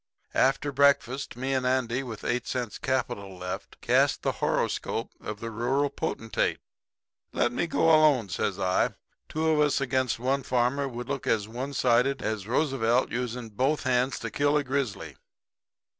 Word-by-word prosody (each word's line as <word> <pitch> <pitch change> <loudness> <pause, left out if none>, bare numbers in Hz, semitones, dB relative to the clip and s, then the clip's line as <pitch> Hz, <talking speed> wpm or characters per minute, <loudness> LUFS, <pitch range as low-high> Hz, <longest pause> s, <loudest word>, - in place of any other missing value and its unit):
"After 135 +2 +2
breakfast 140 -2 +2
me 130 +2 -1
and 130 -1 +1
Andy, 125 -1 +1
with 115 -6 -7
eight 120 0 -1
cents 125 -4 -3
capital 100 -7 -2
left, 90 0 -6
casts - - +3
the - - -1
horoscope - - -1
of 105 -1 -6
the 115 0 -4
rural 135 +6 0
potentate. 115 -4 -1 0.8
"'Let 120 - +2
me 170 +7 -1
go 165 - 0
alone,' 155 -9 +5
says 85 - -1
I. 95 0 +1 0.3
'Two 160 +1 0
of 155 - +2
us 150 -1 +3
against 130 -3 0
one 130 +4 0
farmer 130 +3 +1
would 120 -1 -6
look 135 - -4
as 105 -2 +1
one 125 +5 -5
sided 130 +2 +2
as 110 -2 -2
Roosevelt 125 -2 +1
using 120 -1 -3
both 130 +8 0
hands 130 +1 +1
to - - -4
kill 145 +1 +2
a 145 - +1
grizzly.' 125 - -3
125 Hz, 160 wpm, -27 LUFS, 115-140 Hz, 0.8 s, alone